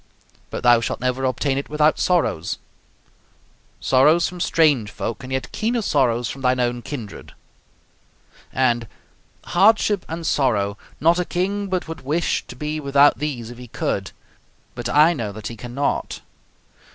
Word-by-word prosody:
But - - -5
thou 120 -1 +6
shalt - - -3
never 125 +1 -1
obtain 135 +2 0
it 140 - -7
without 150 +1 +2
sorrows 170 - +1 1.2
sorrows 150 +6 +4
from 180 - -8
strange 150 -11 +2
folk, 105 +1 -5
and 130 - -8
yet 130 0 -3
keener 230 +1 -1
sorrows 125 - +1
from 135 +6 -7
thine 130 0 +2
own 120 0 0
kindred." 120 -7 -8 1.2
and 120 -3 +1 0.6
"Hardship 210 -2 +3
and 165 +1 -5
sorrow! 105 -10 +1 0.2
Not 170 +3 +3
a - - +2
king 195 +4 -2
but 185 -3 -2
would 165 -3 -7
wish 155 +6 0
to - - -9
be 150 +4 -3
without 140 0 +4
these 125 -6 -4
if 120 - -11
he 125 - -9
could. - - -2 0.6
But 120 -1 -5
I 155 +4 +5
know 115 -9 -4
that 110 +1 -6
he 115 - -7
cannot." 120 +5 -3
135 Hz, 150 wpm, -22 LUFS, 120-165 Hz, 1.2 s, thou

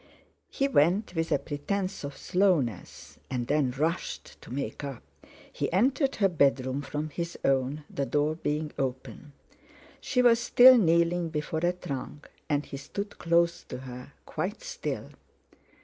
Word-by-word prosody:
He 275 - 0
went, 185 - +2
with 165 -1 -2
a - - +4
pretence 185 +6 -3
of 140 -1 -6
slowness, 175 - 0
and 125 -2 -2
then 145 0 +2
rushed, 155 +7 -3
to - - -13
make 140 +2 -4
up. 140 -4 -6 0.5
He - - -2
entered 265 - +2
her 200 - +3
bedroom 140 -5 +1
from 150 +2 -4
his 170 +2 -4
own, 135 +2 +1
the 140 -1 -3
door 150 +1 +1
being 150 -1 -2
open. 135 +2 -4 0.7
She 250 -2 +1
was 230 -1 +6
still 245 +2 +8
kneeling 170 -4 +3
before 155 0 -2
a 175 +1 +2
trunk, 145 -3 -7 0.2
and 145 -1 +1
he 140 - -7
stood 200 +9 -6
close 170 0 +2
to - - -6
her, 125 -1 -9
quite - - -4
still. - - -5
155 Hz, 150 wpm, -28 LUFS, 140-180 Hz, 0.7 s, still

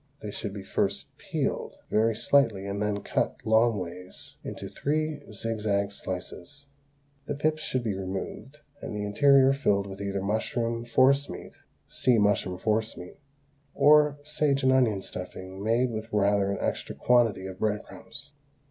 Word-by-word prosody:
They 105 - -4
should 100 0 -5
be 100 -1 -7
first - - -2
peeled - - -2 0.2
very 110 +1 +3
slightly 110 -7 +2
and 100 +1 -3
then 105 -1 -1
cut, - - 0
long 110 0 +4
ways, 90 0 -8
into - - -6
three 155 0 -2
zigzag 105 -2 -1
slices; 95 +8 -7 0.6
the 145 - -2
pips 155 +2 0
should 130 -4 -1
be 110 -3 -1
removed 95 +9 -6 0.2
and - - -5
the 105 - -2
interior 135 +5 +5
filled 100 -8 +1
with 100 0 -8
either 100 -1 -2
mushroom 115 +3 -1
forcemeat 135 +4 +2 0.3
(see 125 -2 +2
MUSHROOM 100 -3 +2
FORCEMEAT) 110 -2 -2 0.6
or 150 -1 +5
sage 145 -2 0
and 130 - +5
onion 115 -7 +3
stuffing 95 +1 -7
made 120 +3 +2
with 110 0 -5
rather 100 -1 +2
an 100 - -2
extra - - -3
quantity 115 -6 +3
of 95 0 -7
bread 105 -1 0
crumbs. 145 +1 -9
110 Hz, 150 wpm, -27 LUFS, 100-130 Hz, 0.6 s, interior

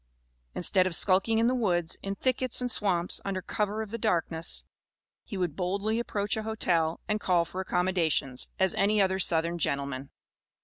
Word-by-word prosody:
Instead 185 +1 +3
of 175 - -1
skulking 195 +5 +3
in 225 - +3
the 250 - +2
woods, 180 -8 0
in 195 0 -4
thickets 255 +1 +1
and 250 -1 0
swamps, 180 -5 +3
under 195 -1 -2
cover 210 +3 -2
of 210 - -11
the 230 - -4
darkness, 165 -3 -1 0.6
he 205 - -6
would 175 -5 -2
boldly 200 +5 -1
approach 205 -3 -2
a 220 - -2
hotel 175 -7 0
and 210 0 0
call 175 -2 +2
for 185 +3 -5
accommodations, 175 -8 0
as 190 -1 +1
any 210 +2 +2
other 190 -1 +2
southern 170 -1 +1
gentleman. 140 -2 -2
190 Hz, 170 wpm, -28 LUFS, 170-215 Hz, 0.6 s, Instead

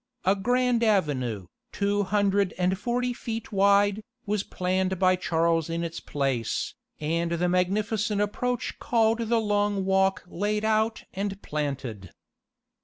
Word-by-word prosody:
A 190 +2 +4
grand 245 +3 +1
avenue, 135 - +1 0.3
two 205 0 0
hundred 200 -1 +1
and 180 +1 +1
forty 245 +4 -1
feet 230 -2 -5
wide, 200 +1 +3 0.2
was 210 -1 0
planned 185 0 -1
by 185 0 +4
Charles 165 -2 +1
in 165 +1 -2
its 165 -1 -4
place, 135 -5 -2 0.3
and 170 +2 -1
the 175 +1 +1
magnificent 205 +4 0
approach 245 +4 -2
called 225 -1 +2
the 230 0 +1
Long 205 -2 0
Walk 190 0 +2
laid 210 +4 -1
out 220 +1 +1
and 195 0 -3
planted. 135 - -4
195 Hz, 130 wpm, -26 LUFS, 170-215 Hz, 0.3 s, A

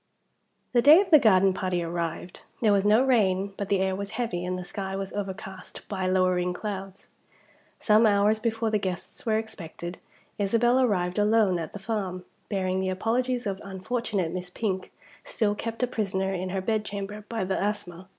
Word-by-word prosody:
THE 240 - +5
day 300 +7 +9
of 390 -2 -1
the 305 - +9
garden 195 -5 +5
party 185 -2 -1
arrived. 170 +1 -4 0.2
There 215 -3 +4
was 200 0 +2
no 215 +4 +5
rain; 200 -6 +2
but 200 -1 -4
the 200 - +3
air 190 0 0
was 200 +1 -4
heavy, 225 -8 -2
and 180 0 -2
the 180 - -5
sky 195 +1 -5
was 195 0 -4
overcast 190 -1 -7
by 190 -2 -2
lowering 185 -1 +2
clouds. 195 -1 -6 0.7
Some 220 +1 +5
hours 205 +1 +3
before 225 0 -1
the 210 - +2
guests 185 +4 -5
were 220 -1 +3
expected, 175 -5 -7 0.4
Isabel 235 +5 +3
arrived 190 -6 +1
alone 210 -4 +3
at 160 - -6
the - - -5
farm, 195 -3 -3 0.2
bearing 190 -2 0
the 190 0 -1
apologies 240 +6 0
of 195 -1 -3
unfortunate 200 -2 -2
Miss 180 0 -5
Pink, 190 -1 -3 0.3
still 210 -3 0
kept 230 +3 -4
a - - +3
prisoner 195 -4 -1
in 185 0 -3
her 190 +1 -2
bed 215 +2 0
chamber 205 0 -6
by 225 -4 -2
the 190 0 -1
asthma. 190 -4 -4
195 Hz, 180 wpm, -27 LUFS, 185-220 Hz, 0.7 s, day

